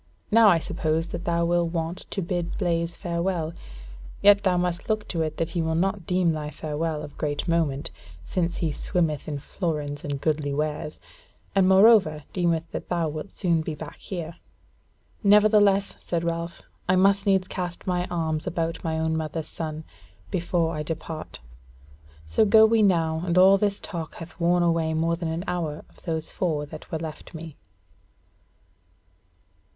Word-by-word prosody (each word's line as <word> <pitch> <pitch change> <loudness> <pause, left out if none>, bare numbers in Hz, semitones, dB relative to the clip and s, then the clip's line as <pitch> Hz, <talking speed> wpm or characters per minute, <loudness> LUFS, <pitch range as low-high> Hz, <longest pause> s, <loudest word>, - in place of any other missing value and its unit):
Now 225 0 +7
I 180 -4 +6
suppose 165 0 -1
that 170 - -5
thou 170 0 +1
will 175 0 +2
want 165 +1 -4
to 195 - -2
bid 175 -1 -2
Blaise 170 -2 -1
farewell: 170 -2 -2 0.7
yet 205 0 +7
thou 185 -2 +2
must 175 +2 -2
look 215 -1 0
to 165 - -1
it 155 -1 -2
that 165 - -1
he 175 - -1
will 160 0 0
not 190 +1 0
deem 180 -2 +2
thy 150 -1 -3
farewell 155 0 -3
of 145 - -10
great 145 -1 -2
moment, 160 -5 0 0.3
since 170 - -1
he 165 -3 0
swimmeth 160 -2 -1
in 150 -2 -3
florins 150 -2 -3
and 145 -1 -3
goodly 145 -2 0
wares; 150 0 -3 0.5
and 190 -1 +4
moreover 190 -6 +6
deemeth 170 -3 +1
that - - -6
thou 170 -3 0
wilt 155 +5 -6
soon 170 -5 0
be 155 -1 -4
back 150 0 -9
here." 170 -3 -6 0.9
"Nevertheless," 205 -1 +5
said 170 -1 -2
Ralph, 170 0 -3 0.3
"I 185 - +5
must 195 +2 +3
needs 190 -1 +3
cast 180 -2 -5
my 180 -1 0
arms 160 -3 -2
about 165 0 -2
my 160 -2 -1
own 160 0 0
mother's 160 0 -3
son 155 -1 -5 0.5
before 170 -2 0
I 155 - -3
depart: 160 - -6 0.8
so 80 - +3
go 220 +1 +7
we 225 0 +4
now, 165 -5 +2
as 170 +1 +1
all 190 +2 +7
this 200 -1 0
talk 170 -5 -6
hath 165 0 -10
worn 175 +1 +3
away 165 -2 +1
more 165 +1 +1
than 170 -1 -3
an 165 +2 -3
hour 165 -4 -3
of - - -22
those 160 -1 -2
four 155 -5 -1
that 155 +1 -10
were 160 - -1
left 160 0 -8
me." 160 -2 -8
170 Hz, 170 wpm, -25 LUFS, 160-180 Hz, 0.9 s, Now